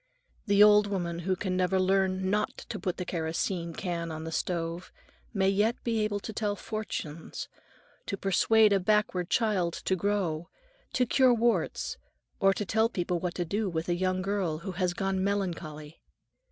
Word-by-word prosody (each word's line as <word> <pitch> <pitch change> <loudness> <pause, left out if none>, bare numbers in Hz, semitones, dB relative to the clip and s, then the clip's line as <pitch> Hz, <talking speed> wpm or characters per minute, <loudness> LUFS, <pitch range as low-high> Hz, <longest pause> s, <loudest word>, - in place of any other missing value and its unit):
The 200 0 +6
old 210 0 +6
woman 175 -4 -2
who 185 +2 0
can 185 0 -2
never 185 +1 +2
learn 190 0 +2
not 210 +1 0
to - - -4
put 180 -4 -2
the 180 - -3
kerosene 170 +1 -2
can 170 -3 -3
on 155 0 -5
the 160 - -5
stove, 170 +1 -3 0.4
may 190 -3 +1
yet 205 +4 +2
be 230 -2 0
able 205 -1 -1
to 220 - -6
tell 205 -1 -1
fortunes, 170 -8 -5 0.6
to 200 - -2
persuade 210 +3 +4
a 195 - +3
backward 190 -2 +1
child 200 -8 +1
to 190 - +2
grow, 180 -4 -1 0.4
to 250 - +2
cure 255 0 +4
warts, 235 +1 0 0.4
or 195 - +5
to 205 +2 -2
tell 220 +3 +2
people 180 -4 -1
what 175 0 -3
to 175 - -1
do 205 +4 -1
with 160 -1 -3
a - - +3
young 185 +1 0
girl 190 -5 -1
who 190 - -2
has 180 -1 -1
gone 195 0 0
melancholy. 165 -6 -3
190 Hz, 175 wpm, -29 LUFS, 175-205 Hz, 0.6 s, The